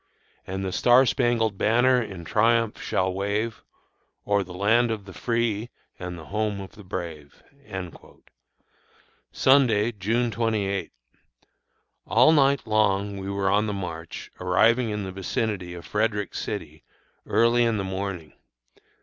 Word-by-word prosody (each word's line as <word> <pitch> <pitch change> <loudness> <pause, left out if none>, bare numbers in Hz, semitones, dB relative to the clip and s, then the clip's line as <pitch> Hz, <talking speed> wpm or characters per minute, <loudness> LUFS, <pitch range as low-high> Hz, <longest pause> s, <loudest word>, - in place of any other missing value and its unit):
And 95 +1 -4
the 95 - -2
star 125 +7 +5
spangled 115 -5 +1
banner 125 +3 +4
in 95 -7 -7
triumph 115 +3 +2
shall 95 +1 0
wave 105 +4 -2 0.6
O'er 100 0 +2
the 90 - -12
land 110 +6 +2
of 110 -3 -4
the 95 - -11
free 115 +1 -1 0.3
and 90 -1 -6
the 80 - -10
home 105 +1 -2
of 95 -1 -8
the 105 - -14
brave." 80 -6 -7 1.9
Sunday, 120 -5 +4
June 115 +3 -1
28. 105 -3 -1 1.2
All 125 +8 +5
night 140 -3 +3
long 100 -2 +1
we 95 0 -5
were 100 -1 0
on 105 +2 +2
the 105 - -2
march, 85 -4 -6
arriving 115 +7 +3
in 105 -1 -3
the 95 - -5
vicinity 95 -1 -3
of 85 - -10
Frederick 105 -1 -1
City - - -5 0.4
early 115 +3 +3
in 115 -2 +1
the 100 - -2
morning. 95 -5 -5
105 Hz, 135 wpm, -25 LUFS, 95-115 Hz, 1.9 s, star